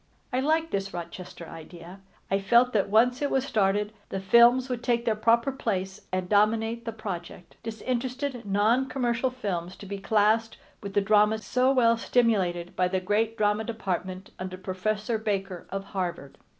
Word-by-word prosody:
I 255 - +2
liked 320 +4 +1
this 195 -1 -3
Rochester 175 0 -8
idea. 170 +3 -11 0.3
I 195 - +2
felt 235 +5 +4
that 200 -2 +1
once 245 +5 +3
it 285 - +1
was 265 0 +1
started 210 -3 +1 0.2
the 195 - -3
films 235 +6 +5
would 250 -2 -3
take 240 -1 0
their 225 -2 +2
proper 230 +4 +2
place 190 -7 -3
and 185 -1 -2
dominate 225 +3 +2
the 230 - -3
project, 185 -5 -7
disinterested 250 +3 -3
non 215 +6 +2
commercial 245 -1 0
films 190 -7 -4
to - - -11
be 200 0 -5
classed 220 +2 +2 0.2
with 200 -1 -7
the 205 - +4
dramas 210 +1 +3
so 255 +1 +2
well 230 -3 +4
stimulated 190 -8 +1
by 180 - +2
the 190 +1 -1
great 215 +4 0
drama 210 +1 +1
department 190 -4 -4
under 185 0 -5
Professor 210 +4 -2
Baker 195 -4 -3
of 195 +1 -4
Harvard. 175 -7 -4
215 Hz, 165 wpm, -27 LUFS, 190-235 Hz, 0.3 s, films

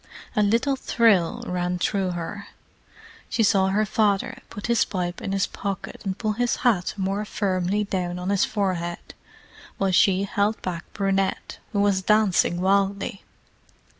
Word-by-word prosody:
A 210 - +3
little 230 +7 +2
thrill 225 -9 +2
ran 180 0 -1
through 190 +1 0
her. 175 +4 -6 0.8
She 225 - +1
saw 195 -2 +4
her 205 +3 +2
father 205 -2 0
put 205 - -7
his 235 -2 +3
pipe 175 -2 -3
in - - -3
his 195 -1 +1
pocket 200 -1 -5
and 195 -2 -3
pull 215 -1 -1
his 240 +3 0
hat 200 -8 +2
more 195 +2 -1
firmly 200 -1 0
down 180 -3 -2
on 180 +2 -2
his 200 -1 +3
forehead, 180 -5 -2 0.6
while 195 -1 +1
she 185 +1 +4
held 205 +2 0
back 175 -2 -5
Brunette, 195 -1 -1
who 200 -3 +1
was 200 -2 +2
dancing 200 -4 +3
wildly. 195 +1 +1
195 Hz, 150 wpm, -24 LUFS, 185-210 Hz, 0.8 s, saw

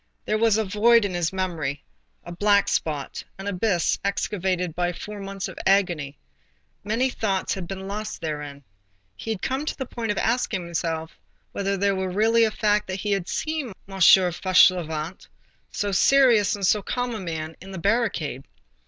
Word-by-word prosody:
There 215 - 0
was 225 -2 +4
a 220 - +1
void 215 +3 +4
in 195 - -3
his 175 -2 0
memory, 165 -7 -3 0.4
a 175 - -9
black 200 +3 +3
spot, 150 -3 -2
an 195 - -8
abyss 190 -3 0
excavated 185 -3 -1
by 175 +1 -1
four 210 +4 -8
months 195 -1 -5
of - - -9
agony.—Many 175 - -2
things 195 -5 -1
had 190 -3 -5
been 190 +1 -6
lost 210 +2 -5
therein. 150 -3 -5 0.5
He 225 - -8
had 215 -4 -3
come 265 +2 -1
to 305 - -4
the 265 - -3
point 230 -3 -3
of 205 - -3
asking 225 -5 0
himself 165 -1 -3 0.3
whether 200 0 -1
it 200 +1 +1
were 190 0 -2
really 225 +4 +3
a - - +1
fact 210 -1 +1
that 190 0 -4
he 210 - -2
had 195 -3 0
seen 310 -8 -3
M. 195 0 -8
Fauchelevent, 180 -2 +4 0.4
so 205 0 -2
serious 225 -1 +4
and 200 -1 -2
so 210 +3 +3
calm 245 +4 -2
a 220 - -4
man, 160 -3 -5
in 190 - -11
the 190 - -7
barricade. 180 - 0
195 Hz, 170 wpm, -24 LUFS, 170-215 Hz, 0.5 s, was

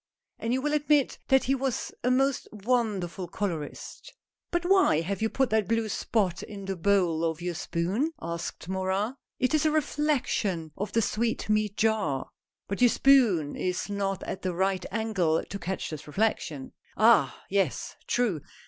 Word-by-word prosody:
And 230 - -2
you 260 +1 0
will 295 0 0
admit 295 -2 +2
that 265 0 +4
he 270 - +1
was 270 -2 -2
a 250 - +2
most 270 +1 +2
wonderful 210 -5 -1
colorist." 170 -5 -5 0.2
" - - -60
But 345 0 0
why 375 - +4
have 190 +4 -3
you 220 - +2
put 265 -1 0
that 215 -3 +2
blue 225 0 +1
spot 195 -4 0
in 200 -3 -8
the 195 0 -2
bowl 175 -3 +2
of 160 -1 -1
your 175 0 -3
spoon? 185 - -1
" - - -30
asked 170 0 -5
Morin. 190 +4 -1
" - - -63
It 255 +3 +1
is 310 - +3
a 310 - +4
reflection 285 - 0
of 205 +1 -4
the 230 - +2
sweetmeat 215 -2 0
jar." 215 -12 0 0.2
" - - -65
But 200 +4 -4
your 245 - +7
spoon 225 - +4
is 180 +2 -2
not 195 -1 -2
at - - -5
the 185 -2 -2
right 190 0 +1
angle 195 -7 0
to 200 - -7
catch 185 0 -4
this 155 -1 -7
reflection." 155 -6 -1
" - - -31
Ah! 210 - +5
yes, 195 -7 0
true. 220 -11 +1
200 Hz, 180 wpm, -28 LUFS, 180-245 Hz, 0.2 s, your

